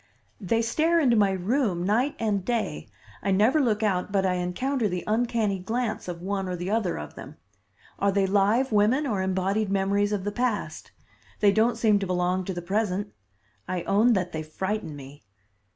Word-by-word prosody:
"They 225 Hz, +3 st, 0 dB
stare 320 Hz, +8 st, +2 dB
into 255 Hz, -7 st, +3 dB
my 205 Hz, -2 st, +4 dB
room 190 Hz, -1 st, 0 dB
night 235 Hz, +9 st, +1 dB
and 205 Hz, -4 st, -1 dB
day. 235 Hz, +1 st, -2 dB, 0.3 s
I 200 Hz, -, -2 dB
never 215 Hz, +10 st, +3 dB
look 220 Hz, -5 st, +1 dB
out 195 Hz, -2 st, 0 dB
but 195 Hz, -1 st, +1 dB
I 185 Hz, -, +2 dB
encounter 215 Hz, +8 st, -1 dB
the 180 Hz, -3 st, -3 dB
uncanny 220 Hz, -3 st, 0 dB
glance 225 Hz, +4 st, -3 dB
of 175 Hz, -1 st, -6 dB
one 195 Hz, 0 st, -2 dB
or 180 Hz, -, -2 dB
the 175 Hz, +3 st, -4 dB
other 215 Hz, -5 st, 0 dB
of 75 Hz, -1 st, -7 dB
them. -, -, -10 dB, 0.6 s
Are 200 Hz, 0 st, +2 dB
they 195 Hz, 0 st, +2 dB
live 205 Hz, +7 st, +2 dB
women 220 Hz, +8 st, +3 dB
or 210 Hz, -8 st, -1 dB
embodied 190 Hz, +3 st, 0 dB
memories 200 Hz, +1 st, +1 dB
of 205 Hz, -3 st, -1 dB
the 205 Hz, -, -2 dB
past? 240 Hz, -1 st, -3 dB, 0.5 s
They 205 Hz, -1 st, +5 dB
don't 220 Hz, +4 st, +2 dB
seem 210 Hz, -3 st, +3 dB
to 195 Hz, -, -3 dB
belong 180 Hz, +1 st, 0 dB
to 190 Hz, -, -3 dB
the 175 Hz, -, -5 dB
present. 205 Hz, +1 st, -1 dB, 0.5 s
I 180 Hz, -2 st, -2 dB
own 220 Hz, +5 st, +3 dB
that 180 Hz, -3 st, -1 dB
they 160 Hz, -, -4 dB
frighten 190 Hz, +2 st, -4 dB
me." 140 Hz, +1 st, -11 dB
200 Hz, 185 wpm, -26 LUFS, 185-225 Hz, 0.6 s, They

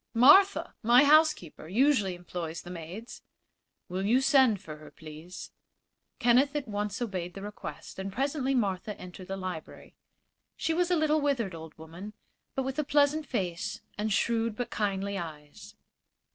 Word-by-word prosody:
"Martha, 380 Hz, +12 st, +6 dB
my 240 Hz, +4 st, +6 dB
housekeeper, 295 Hz, -, +3 dB
usually 210 Hz, -, +2 dB
employs 175 Hz, -2 st, -6 dB
the 175 Hz, -, -9 dB
maids." 180 Hz, +7 st, -8 dB, 0.7 s
"Will 185 Hz, +2 st, -3 dB
you 230 Hz, +6 st, +4 dB
send 265 Hz, -6 st, +4 dB
for 155 Hz, -5 st, -9 dB
her, 155 Hz, -, -13 dB
please?" 160 Hz, +3 st, -10 dB, 0.7 s
Kenneth 250 Hz, +4 st, +3 dB
at 290 Hz, -4 st, -2 dB
once 205 Hz, -1 st, -3 dB
obeyed 180 Hz, -5 st, -4 dB
the 195 Hz, -, -7 dB
request, 210 Hz, -2 st, -8 dB
and 195 Hz, +1 st, -4 dB
presently 270 Hz, +3 st, -1 dB
Martha 205 Hz, -3 st, -1 dB
entered 180 Hz, 0 st, -10 dB
the 195 Hz, -, -4 dB
library. 185 Hz, -4 st, -7 dB, 0.6 s
She 320 Hz, -, 0 dB
was 350 Hz, +1 st, +1 dB
a 360 Hz, -, +3 dB
little, 310 Hz, 0 st, +2 dB
withered 255 Hz, -10 st, 0 dB
old 160 Hz, -1 st, -10 dB
woman, 170 Hz, +6 st, -9 dB, 0.4 s
but 270 Hz, -, 0 dB
with 265 Hz, +3 st, -3 dB
a -, -, +2 dB
pleasant 290 Hz, +1 st, +2 dB
face 180 Hz, -7 st, -3 dB
and 215 Hz, +1 st, -2 dB
shrewd 230 Hz, +1 st, +1 dB
but 245 Hz, +1 st, -4 dB
kindly 200 Hz, -1 st, -1 dB
eyes. 150 Hz, -4 st, -9 dB
210 Hz, 155 wpm, -29 LUFS, 180-270 Hz, 0.7 s, Martha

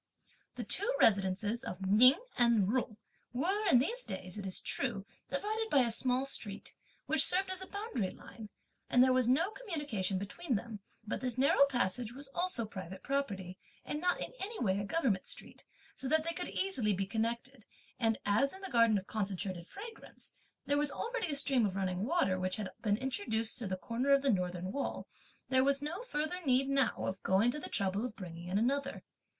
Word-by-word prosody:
The -, -, -4 dB
two -, -, +2 dB
residences 205 Hz, +3 st, +2 dB
of 190 Hz, -4 st, -5 dB
Ning 250 Hz, -, +7 dB, 0.2 s
and 235 Hz, -4 st, +4 dB
Jung 240 Hz, -4 st, -1 dB, 0.4 s
were, 385 Hz, -, 0 dB
in 255 Hz, -, +7 dB
these 470 Hz, -, +1 dB
days, 185 Hz, -1 st, -6 dB
it 200 Hz, -2 st, -5 dB
is 185 Hz, -, -2 dB
true, 220 Hz, -8 st, -1 dB, 0.2 s
divided 435 Hz, +2 st, -1 dB
by 280 Hz, -, +5 dB
a 235 Hz, -2 st, +2 dB
small 255 Hz, +3 st, +2 dB
street, 210 Hz, -7 st, -5 dB, 0.3 s
which 315 Hz, -1 st, +5 dB
served 375 Hz, +1 st, +3 dB
as 375 Hz, 0 st, -3 dB
a 380 Hz, -, -6 dB
boundary 405 Hz, -, -3 dB
line, 215 Hz, +3 st, -11 dB, 0.4 s
and 250 Hz, -, +6 dB
there 260 Hz, 0 st, +4 dB
was 255 Hz, -2 st, +3 dB
no 330 Hz, +10 st, +3 dB
communication 295 Hz, -, -2 dB
between 240 Hz, -, -3 dB
them, 215 Hz, +1 st, -5 dB, 0.3 s
but 215 Hz, -, -3 dB
this 250 Hz, -2 st, -1 dB
narrow 275 Hz, +1 st, +5 dB
passage 245 Hz, -2 st, -1 dB
was 275 Hz, +2 st, -10 dB
also 345 Hz, -7 st, -1 dB
private 190 Hz, -2 st, -8 dB
property, 200 Hz, -10 st, -2 dB, 0.3 s
and 295 Hz, -, -3 dB
not 360 Hz, 0 st, +1 dB
in -, -, -5 dB
any 430 Hz, +4 st, -4 dB
way 195 Hz, -3 st, +1 dB
a 200 Hz, -, -2 dB
government 230 Hz, -, 0 dB
street, -, -, -8 dB, 0.3 s
so 270 Hz, -, -5 dB
that 315 Hz, +3 st, +3 dB
they 335 Hz, +1 st, -2 dB
could 355 Hz, +1 st, -4 dB
easily 255 Hz, -, +1 dB
be 195 Hz, +1 st, -1 dB
connected, 230 Hz, +3 st, -3 dB, 0.3 s
and 225 Hz, -1 st, +2 dB
as 220 Hz, +7 st, +3 dB
in 380 Hz, -, -11 dB
the 385 Hz, -, -7 dB
garden 230 Hz, -3 st, +5 dB
of 190 Hz, -, -4 dB
Concentrated 195 Hz, -4 st, -3 dB
Fragrance, 445 Hz, +3 st, -11 dB, 0.3 s
there 285 Hz, +1 st, +2 dB
was 295 Hz, 0 st, +1 dB
already 470 Hz, -4 st, -2 dB
a 295 Hz, -, -1 dB
stream 275 Hz, -3 st, +2 dB
of 195 Hz, -3 st, 0 dB
running 190 Hz, 0 st, -1 dB
water, 260 Hz, -, +1 dB
which 185 Hz, 0 st, -1 dB
had 205 Hz, -3 st, -4 dB
been 205 Hz, -2 st, +1 dB
introduced 225 Hz, -3 st, -1 dB
through 230 Hz, -, -4 dB
the 185 Hz, 0 st, -2 dB
corner 230 Hz, +8 st, -2 dB
of 275 Hz, 0 st, +4 dB
the 275 Hz, -, +4 dB
Northern 180 Hz, 0 st, -2 dB
wall, 280 Hz, +5 st, -3 dB, 0.4 s
there 260 Hz, 0 st, +4 dB
was 280 Hz, 0 st, +3 dB
no 310 Hz, +8 st, -4 dB
further 360 Hz, -5 st, -3 dB
need 265 Hz, -1 st, +3 dB
now 275 Hz, -3 st, +1 dB
of 190 Hz, +1 st, -3 dB
going 200 Hz, +6 st, +3 dB
to 300 Hz, -, -5 dB
the -, -, -7 dB
trouble 195 Hz, +2 st, 0 dB
of 245 Hz, -3 st, -4 dB
bringing 175 Hz, -2 st, -8 dB
in 185 Hz, +2 st, 0 dB
another. 275 Hz, +5 st, 0 dB
245 Hz, 200 wpm, -33 LUFS, 200-285 Hz, 0.4 s, Ning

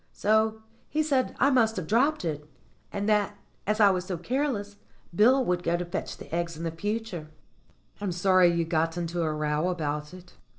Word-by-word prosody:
So 220 Hz, +1 st, +1 dB, 0.3 s
he 310 Hz, +1 st, +1 dB
said 270 Hz, -4 st, 0 dB
I 280 Hz, -, +4 dB
must 225 Hz, -4 st, +3 dB
have 185 Hz, -, -3 dB
dropped 250 Hz, -, +2 dB
it, 150 Hz, -2 st, -4 dB, 0.4 s
and 200 Hz, +1 st, -2 dB
that, 210 Hz, -1 st, +1 dB, 0.3 s
as 215 Hz, +1 st, +1 dB
I 205 Hz, -2 st, +7 dB
was 185 Hz, -1 st, -2 dB
so 185 Hz, -2 st, -3 dB
careless, 210 Hz, -, -2 dB, 0.4 s
Bill 250 Hz, +7 st, +5 dB
would 180 Hz, -3 st, 0 dB
go 170 Hz, 0 st, +1 dB
to 175 Hz, -, -3 dB
fetch 175 Hz, +3 st, -5 dB
the -, -, -12 dB
eggs 170 Hz, -1 st, -2 dB
in 165 Hz, 0 st, -3 dB
future." 205 Hz, -2 st, -4 dB, 0.7 s
"I'm 200 Hz, -3 st, -1 dB
sorry 180 Hz, 0 st, +4 dB
you 170 Hz, -1 st, 0 dB
got 165 Hz, 0 st, 0 dB
into 170 Hz, 0 st, -2 dB
a 160 Hz, -2 st, 0 dB
row 150 Hz, +2 st, 0 dB
about 150 Hz, -4 st, -3 dB
it." 180 Hz, -1 st, -14 dB
185 Hz, 185 wpm, -27 LUFS, 170-220 Hz, 0.7 s, I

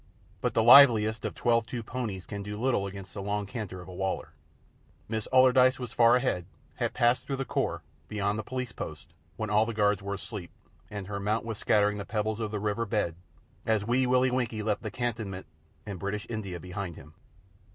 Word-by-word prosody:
But -, -, -1 dB
the 115 Hz, -, +4 dB
liveliest 115 Hz, -4 st, +7 dB
of -, -, -3 dB
twelve 115 Hz, -2 st, +2 dB
two 120 Hz, -2 st, -4 dB
ponies 110 Hz, -7 st, -4 dB
can 100 Hz, -2 st, -6 dB
do 105 Hz, +1 st, -6 dB
little 120 Hz, -5 st, +1 dB
against 95 Hz, -1 st, -9 dB
the 100 Hz, -, -5 dB
long 105 Hz, +1 st, -2 dB
canter 100 Hz, -4 st, -6 dB
of -, -, -12 dB
a 90 Hz, -, -9 dB
Waler. 95 Hz, +1 st, -2 dB, 0.8 s
Miss 110 Hz, -1 st, -3 dB
Allardyce 130 Hz, 0 st, +6 dB
was 125 Hz, -3 st, -6 dB
far 120 Hz, 0 st, +6 dB
ahead, 120 Hz, -9 st, 0 dB, 0.3 s
had -, -, -1 dB
passed 120 Hz, 0 st, +2 dB
through 135 Hz, -, -1 dB
the 135 Hz, 0 st, -3 dB
crops, -, -, -1 dB, 0.2 s
beyond 105 Hz, +1 st, -1 dB
the -, -, -3 dB
Police 125 Hz, 0 st, -4 dB
post, -, -, -8 dB, 0.2 s
when 110 Hz, -1 st, -3 dB
all 105 Hz, +2 st, +4 dB
the 115 Hz, -, -4 dB
guards 105 Hz, -2 st, +2 dB
were 100 Hz, 0 st, -3 dB
asleep, 100 Hz, -3 st, -7 dB, 0.4 s
and 100 Hz, -2 st, -6 dB
her 100 Hz, +1 st, -4 dB
mount 105 Hz, +3 st, -1 dB
was 115 Hz, -2 st, -5 dB
scattering 105 Hz, 0 st, +2 dB
the -, -, -3 dB
pebbles 110 Hz, +1 st, -2 dB
of 110 Hz, -2 st, -2 dB
the 105 Hz, 0 st, -3 dB
river 105 Hz, +2 st, -1 dB
bed 105 Hz, -6 st, 0 dB, 0.5 s
as 110 Hz, -2 st, +1 dB
Wee 125 Hz, +3 st, +2 dB
Willie 130 Hz, 0 st, +3 dB
Winkie 115 Hz, -4 st, -1 dB
left 105 Hz, -1 st, 0 dB
the -, -, -4 dB
cantonment 110 Hz, -6 st, -3 dB, 0.4 s
and 100 Hz, -4 st, -6 dB
British 100 Hz, +3 st, -3 dB
India 100 Hz, -6 st, -4 dB
behind 90 Hz, 0 st, -5 dB
him. 75 Hz, +3 st, -13 dB
105 Hz, 205 wpm, -29 LUFS, 100-120 Hz, 0.8 s, liveliest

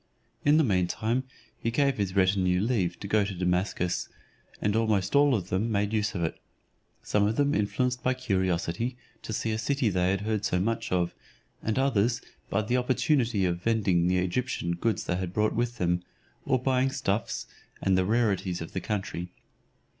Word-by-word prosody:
In 145 Hz, +1 st, +5 dB
the 160 Hz, -, +5 dB
mean 95 Hz, -8 st, +2 dB
time 115 Hz, +7 st, -1 dB, 0.3 s
he 115 Hz, -, -1 dB
gave 140 Hz, +2 st, +2 dB
his 100 Hz, -2 st, -2 dB
retinue 95 Hz, -1 st, +3 dB
leave 100 Hz, -5 st, 0 dB
to 100 Hz, -, -4 dB
go 105 Hz, +1 st, +3 dB
to 100 Hz, -1 st, -4 dB
Damascus; 90 Hz, 0 st, 0 dB, 0.5 s
and 105 Hz, 0 st, 0 dB
almost 105 Hz, -3 st, +1 dB
all 140 Hz, -2 st, +5 dB
of 95 Hz, -4 st, -3 dB
them 105 Hz, +5 st, 0 dB
made 105 Hz, 0 st, 0 dB
use 105 Hz, -1 st, 0 dB
of 85 Hz, -, -1 dB
it: 80 Hz, -, -2 dB, 0.6 s
some 105 Hz, 0 st, +2 dB, 0.3 s
influenced 125 Hz, +4 st, 0 dB
by 130 Hz, 0 st, +1 dB
curiosity 95 Hz, 0 st, -1 dB, 0.2 s
to -, -, -7 dB
see 110 Hz, +1 st, -1 dB
a 110 Hz, -, -1 dB
city 135 Hz, -1 st, +1 dB
they 90 Hz, -1 st, +1 dB
had 95 Hz, 0 st, 0 dB
heard 110 Hz, -1 st, -1 dB
so 90 Hz, -, +1 dB
much 115 Hz, +4 st, -1 dB
of, 90 Hz, -2 st, +1 dB, 0.5 s
and 110 Hz, -, -1 dB
others 120 Hz, -4 st, +2 dB, 0.3 s
by 110 Hz, +2 st, +1 dB
the 120 Hz, +4 st, +1 dB
opportunity 125 Hz, -4 st, +2 dB
of 85 Hz, -1 st, -1 dB
vending 95 Hz, -6 st, +2 dB
the 90 Hz, +1 st, +2 dB
Egyptian 90 Hz, 0 st, -1 dB
goods 105 Hz, +6 st, 0 dB
they 90 Hz, -, -1 dB
had 90 Hz, -1 st, -4 dB
brought 105 Hz, +1 st, +2 dB
with 120 Hz, +1 st, -1 dB
them, 90 Hz, 0 st, +1 dB, 0.4 s
or 130 Hz, -, +3 dB
buying 130 Hz, +1 st, +1 dB
stuffs, 115 Hz, -6 st, -2 dB, 0.3 s
and 95 Hz, -, +2 dB
the 95 Hz, -, +3 dB
rarities 100 Hz, -4 st, +1 dB
of 80 Hz, -, -7 dB
the 95 Hz, -, -2 dB
country. 95 Hz, -4 st, -3 dB
105 Hz, 180 wpm, -28 LUFS, 90-120 Hz, 0.6 s, In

